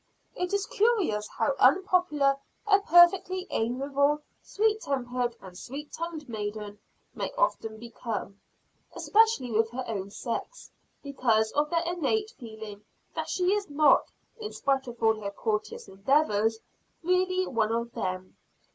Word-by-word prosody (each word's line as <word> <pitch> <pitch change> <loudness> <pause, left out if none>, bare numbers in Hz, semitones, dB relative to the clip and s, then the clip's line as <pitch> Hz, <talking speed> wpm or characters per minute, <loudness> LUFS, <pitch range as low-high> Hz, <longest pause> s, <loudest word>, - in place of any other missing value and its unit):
It 360 0 -2
is 400 0 0
curious 400 - +1
how 280 - 0
unpopular 300 -3 +3 0.3
a 400 -1 +5
perfectly 365 0 +5
amiable, 280 +5 +1 0.2
sweet 430 +1 0
tempered 245 -3 -2
and 185 -2 -12
sweet 280 +10 -8
tongued 330 -3 -5
maiden 210 -2 -5 0.3
may - - -4
often 225 - 0
become, 220 -3 -6 0.5
especially 440 - +3
with 225 +1 +2
her 255 +2 -4
own 200 -3 -4
sex, 235 - -5 0.3
because 235 -6 +1
of 295 +1 +1
their 335 +1 +1
innate 355 +6 -1
feeling 220 - -10 0.3
that - - -4
she 365 +1 +1
is 410 -4 -2
not, 295 +1 +4 0.3
in 430 -1 -5
spite 270 -1 0
of 240 -1 -8
all 220 -1 +3
her 200 - -3
courteous 210 +1 -3
endeavors, 220 +1 +1 0.5
really 370 +1 +2
one 225 -6 0
of 235 +1 -2
them. 185 -2 -4
270 Hz, 135 wpm, -28 LUFS, 220-360 Hz, 0.5 s, a